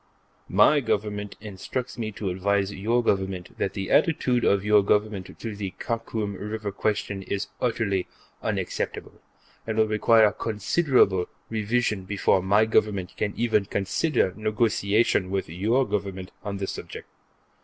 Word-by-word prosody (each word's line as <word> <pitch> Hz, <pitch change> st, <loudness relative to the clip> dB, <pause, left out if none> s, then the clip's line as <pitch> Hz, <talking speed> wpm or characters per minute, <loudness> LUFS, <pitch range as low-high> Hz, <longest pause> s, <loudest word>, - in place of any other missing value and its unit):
My 105 Hz, +10 st, +5 dB
Government 105 Hz, -4 st, -2 dB
instructs 110 Hz, +5 st, -5 dB
me 110 Hz, -2 st, -3 dB
to 100 Hz, -2 st, -3 dB
advise 100 Hz, +2 st, 0 dB
your 115 Hz, +5 st, +1 dB
Government 95 Hz, -4 st, -1 dB
that 95 Hz, -, -1 dB
the 95 Hz, -1 st, -3 dB
attitude 125 Hz, -7 st, +3 dB
of 100 Hz, 0 st, +2 dB
your 105 Hz, 0 st, +6 dB
Government 105 Hz, -1 st, 0 dB
in 110 Hz, -2 st, -7 dB
the 100 Hz, -2 st, -5 dB
Khakum 115 Hz, -3 st, -3 dB
River 105 Hz, +1 st, -4 dB
question 100 Hz, -1 st, -2 dB
is 100 Hz, +1 st, -3 dB
utterly 105 Hz, -6 st, 0 dB, 0.3 s
unacceptable, -, -, -3 dB, 0.5 s
and 110 Hz, -1 st, -2 dB
will 110 Hz, -, +5 dB
require 110 Hz, 0 st, +5 dB
considerable 110 Hz, -, +2 dB, 0.2 s
revision 110 Hz, -2 st, 0 dB
before 95 Hz, -1 st, +2 dB
my 100 Hz, +4 st, +4 dB
Government 100 Hz, -4 st, +1 dB
can 105 Hz, -, -1 dB
even 110 Hz, -4 st, +2 dB
consider 100 Hz, -, 0 dB
negotiation 110 Hz, -2 st, +1 dB
with 95 Hz, 0 st, -1 dB
your 110 Hz, +10 st, +1 dB
Government 95 Hz, -2 st, -3 dB
on 100 Hz, -1 st, -4 dB
the 95 Hz, -, -2 dB
subject. -, -, -7 dB
105 Hz, 135 wpm, -25 LUFS, 95-110 Hz, 0.5 s, your